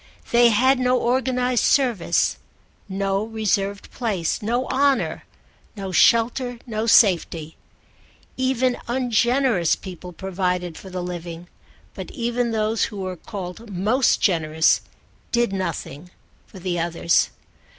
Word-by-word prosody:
They 240 0 +6
had 260 +4 +3
no 250 0 +2
organised 250 0 +1
service, 235 -11 +2 0.5
no 195 +1 -1
reserved 205 -2 -2
place, 200 -10 -2
no 240 +4 0
honour, 275 0 +1 0.5
no 195 -2 -5
shelter, 240 +5 +3
no 220 -2 -3
safety. 170 -7 +3 0.8
Even 260 -1 0
ungenerous 240 - +2
people 180 -1 -9
provided 180 -1 -2
for 190 - -10
the 180 -1 -4
living, 175 -1 -7 0.4
but - - -7
even 240 -1 -1
those 220 0 0
who 210 - -8
were 185 -1 -4
called 190 +5 -8
most 215 +8 +2
generous 160 -4 +2 0.5
did 235 -4 +1
nothing 175 -3 -4 0.4
for - - -14
the 180 -1 -2
others. 170 0 +1
210 Hz, 115 wpm, -22 LUFS, 180-245 Hz, 0.8 s, They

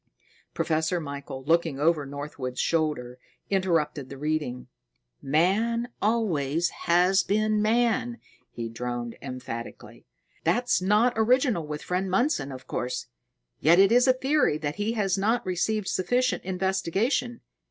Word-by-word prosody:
Professor 160 +2 0
Michael, 140 -3 -7
looking 160 -1 +1
over 150 -2 +2
Northwood's 140 -3 -6
shoulder, 150 -7 -1 0.3
interrupted 165 -8 0
the 140 - -8
reading: 150 -4 -2 0.6
"Man 210 - +1
always 175 -8 +1 0.2
has 180 +3 +4
been 215 +1 +1
man," 235 +2 +1 0.3
he 115 -1 -5
droned 120 0 -5
emphatically. 125 - -8 0.4
"That's 245 -4 +2
not 210 +6 +3
original 230 - +2
with 150 0 -5
friend 185 +1 -1
Mundson, 190 - +1
of 130 -1 -9
course; 125 0 -4 0.5
yet 165 +3 +5
it 195 +2 +6
is 245 +2 +5
a 255 - +6
theory 265 - +1
that 150 +1 -4
has 205 -2 0
not 225 +4 +1
received 190 +3 -1
sufficient 245 +8 0
investigation." 190 - -1
180 Hz, 120 wpm, -26 LUFS, 145-220 Hz, 0.6 s, it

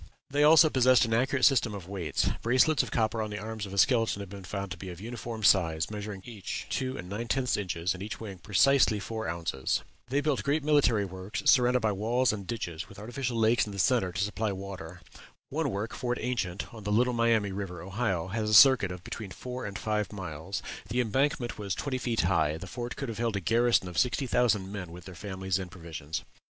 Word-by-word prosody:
They 145 +1 +3
also 155 +1 +7
possessed 130 -1 +5
an 115 - -2
accurate 130 +3 +2
system 120 -6 +3
of 95 -4 -8
weights; 90 -7 -1
bracelets 130 +6 +4
of - - -5
copper 110 -1 0
on 110 - -3
the 105 - -5
arms 110 -1 -5
of - - -10
a 100 - -6
skeleton 115 -3 +3
have 100 -1 -8
been 100 -1 -8
found 100 +1 -5
to - - -5
be 95 - -7
of 90 -1 -8
uniform 115 0 -6
size, 85 -4 +3
measuring 105 -2 -6
each 110 -6 -6
two 130 0 -2
and 90 - -7
nine 105 +5 -4
tenth 125 0 +1
inches, 90 -3 -1
and 95 - -9
each 105 +2 -5
weighing 100 -5 -8
precisely 110 +3 +4
four 110 0 -4
ounces. 85 -6 -2 0.3
They 140 +2 +1
built 145 -2 0
great 145 +2 0
military 145 -8 +3
works 95 +2 -6
surrounded 125 -1 +5
by 110 - +2
walls 115 +4 +1
and 100 -3 -6
ditches, 90 -7 -4
with 100 - -13
artificial 120 +3 -3
lakes 115 0 +3
in 105 - -7
the - - -7
centre 100 -2 +2
to 95 +3 -1
supply 105 +1 -1
water. 95 -4 -7 0.5
One 150 0 -1
work, 105 +1 -3
Fort 125 -1 -2
Ancient, 110 -7 -3
on 110 -2 -10
the 105 - -2
Little 125 +4 +3
Miami 115 -4 +2
River, 95 -3 -5
Ohio, 95 -3 -2
has 110 +1 -1
a 110 - +4
circuit 125 -6 +7
of 90 -1 -8
between 105 +1 -6
four 125 +4 -6
and 100 0 -5
five 105 -2 -1
miles; 95 -1 -5 0.3
the 120 +3 0
embankment 125 0 0
was 100 -3 -2
twenty 130 -3 -2
feet 120 -2 0
high; 80 -4 +1
the 80 - -8
fort 120 +5 -5
could 135 - -4
have 115 -1 -5
held 115 -3 0
a - - 0
garrison 115 +2 +2
of 90 - -2
sixty 125 +2 +1
thousand 110 -6 +1
men 95 -4 -6
with 90 +1 -11
their 95 - -9
families 95 +1 -3
and 95 -1 -6
provisions. 80 -4 -6
105 Hz, 220 wpm, -29 LUFS, 95-120 Hz, 0.5 s, also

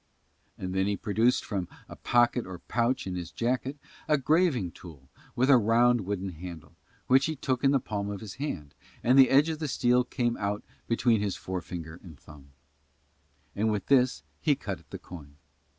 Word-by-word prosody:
And 95 0 -5
then 95 +1 +1
he 100 -1 0
produced 115 +3 +1
from 95 -4 -3 0.2
a - - -10
pocket 120 -1 +2
or 95 -1 -7
pouch 120 +7 -1
in 95 - -4
his 90 -2 -5
jacket 130 +4 -2 0.3
a 150 -1 +4
graving 140 - +2
tool 75 -8 -13 0.3
with 130 +2 +2
a 135 -3 +7
round 115 -1 +3
wooden 100 -1 -2
handle, 85 -2 -10 0.3
which 135 +3 +4
he 160 - -2
took 130 -2 -2
in 135 - +5
the 135 0 +3
palm 100 -4 -4
of 100 -1 -5
his 105 -3 -8
hand, 75 - -4 0.3
and 125 +2 +4
the 135 -1 +7
edge 145 +4 +5
of 160 -1 -3
the 155 - -2
steel 125 -2 +2
came 120 -1 -1
out 100 0 -2 0.2
between 115 -2 +2
his 100 -2 -1
forefinger 90 -3 -6
and 80 -6 -13
thumb: 70 -2 -15 1.1
and 110 +2 +1
with 105 -2 -2
this 130 -2 +3 0.2
he 150 -3 +2
cut 100 -8 -5
at - - -24
the - - -6
coin. 75 -5 -12
110 Hz, 190 wpm, -28 LUFS, 90-130 Hz, 1.1 s, a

